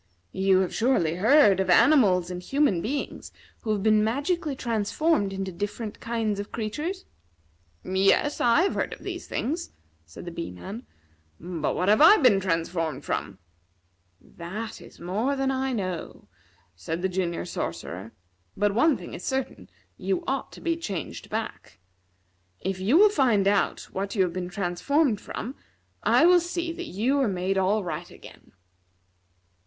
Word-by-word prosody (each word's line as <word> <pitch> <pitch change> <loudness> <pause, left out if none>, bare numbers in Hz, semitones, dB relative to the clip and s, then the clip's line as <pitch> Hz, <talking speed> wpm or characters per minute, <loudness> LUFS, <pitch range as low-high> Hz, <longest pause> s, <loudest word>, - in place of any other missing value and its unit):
"You 190 0 +3
have 185 - -2
surely 180 -10 +1
heard 215 -2 +5
of 190 -1 0
animals 185 - +5
and 180 0 -5
human 270 - +1
beings 275 +8 -4 0.3
who 225 - -6
have 205 -2 -1
been 215 -1 +4
magically 285 +6 -1
transformed 230 +1 0
into 190 0 -4
different 205 +4 -5
kinds 225 -3 -2
of 205 - -6
creatures?" 300 - -4 0.8
"Yes, 195 +10 +2
I 240 +8 +4
have 395 - +1
heard - - -2
of - - -12
these - - -6
things," 320 +9 -3 0.3
said 80 - -12
the 175 - -6
Bee 170 0 -5
man; 195 - -9 0.5
"but 170 -4 -3
what 180 - 0
have 210 +6 +5
I 340 +7 +9
been 245 -9 +5
transformed 165 -5 -2
from?" 100 -2 -3 0.8
"That 210 +7 -7
is - - -15
more 215 +11 -1
than 270 0 0
I 265 0 -1
know," 185 -7 -4 0.5
said 160 - -5
the - - +3
Junior 180 -2 -2
Sorcerer. 90 - -5 0.5
"But 205 0 +2
one 270 +6 +3
thing 175 - -10
is 175 - -7
certain 255 - -3 0.3
you 190 -1 -1
ought 270 0 -2
to - - -12
be 335 -1 0
changed 180 - -6
back. - - -5 0.8
If 190 0 -3
you 215 - +3
will 420 +3 +7
find 240 - +2
out 200 0 +1
what 195 +2 -3
you 195 - +4
have 175 -2 -2
been 180 -1 -4
transformed 205 - 0
from, 250 - -6 0.5
I - - +4
will 355 0 +7
see 345 0 -3
that - - -7
you 245 +9 0
are 270 - +2
made 190 0 0
all 200 +3 +1
right 170 0 -5
again. - - -15
205 Hz, 160 wpm, -26 LUFS, 180-265 Hz, 0.8 s, I